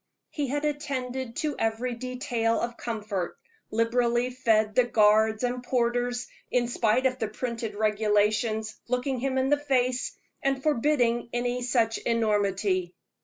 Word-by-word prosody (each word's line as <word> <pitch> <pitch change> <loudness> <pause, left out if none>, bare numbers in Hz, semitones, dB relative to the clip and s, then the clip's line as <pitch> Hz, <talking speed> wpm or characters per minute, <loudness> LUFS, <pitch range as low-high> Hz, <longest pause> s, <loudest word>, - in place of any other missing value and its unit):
He 290 -2 -2
had 290 +3 -1
attended 265 -4 -3
to 305 -1 -1
every 225 +3 0
detail 240 -2 -1
of 235 0 -3
comfort, 210 -7 -4 0.3
liberally 240 +2 +1
fed 220 -4 +2
the 250 - +5
guards 220 0 +4
and 245 0 -1
porters, 245 0 0 0.2
in 245 -1 +1
spite 240 +2 +2
of 255 -1 +1
the 220 - 0
printed 230 -1 -4
regulations 215 +1 +1
looking 250 +1 -1
him 265 +1 -1
in 260 0 +2
the 290 - +4
face 255 -3 0 0.3
and 270 -1 0
forbidding 245 -5 +2
any 245 +1 -1
such 235 -2 +1
enormity. 200 -5 0
240 Hz, 135 wpm, -27 LUFS, 220-255 Hz, 0.3 s, the